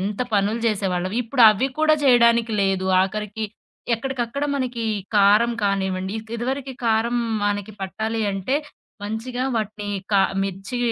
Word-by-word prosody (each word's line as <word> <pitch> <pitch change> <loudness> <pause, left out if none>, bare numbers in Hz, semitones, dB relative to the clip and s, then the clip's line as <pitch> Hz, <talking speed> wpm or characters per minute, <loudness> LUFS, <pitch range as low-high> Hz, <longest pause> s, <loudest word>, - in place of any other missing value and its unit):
ఎంత 200 +4 -2
పనులు 205 +3 +1
జేసేవాళ్లం, 190 -3 -1
ఇప్పుడవి 225 -1 +5
కుడా 310 0 +4
జేయడానికి 235 -3 +4
లేదు 190 -1 0
ఆఖరికి. 210 +3 -2 0.5
ఎక్కడికక్కడ 255 +2 -3
మనకి 250 -4 -2 0.3
కారం 210 +4 +5
కానివ్వండి. 190 -1 -1
ఇక్ 220 +1 -17
ఇదివరికి 265 +3 -3
కారం 230 +1 +1 0.3
మనకి 205 0 -2
పట్టాలి 220 +4 -3
అంటే, 195 +8 -1 0.5
మంచిగా 230 +5 -3
వాటిని 210 -1 -3 0.2
కా 200 - +5 0.2
మిర్చి 195 +5 -4
220 Hz, 120 wpm, -22 LUFS, 195-240 Hz, 0.5 s, ఇప్పుడవి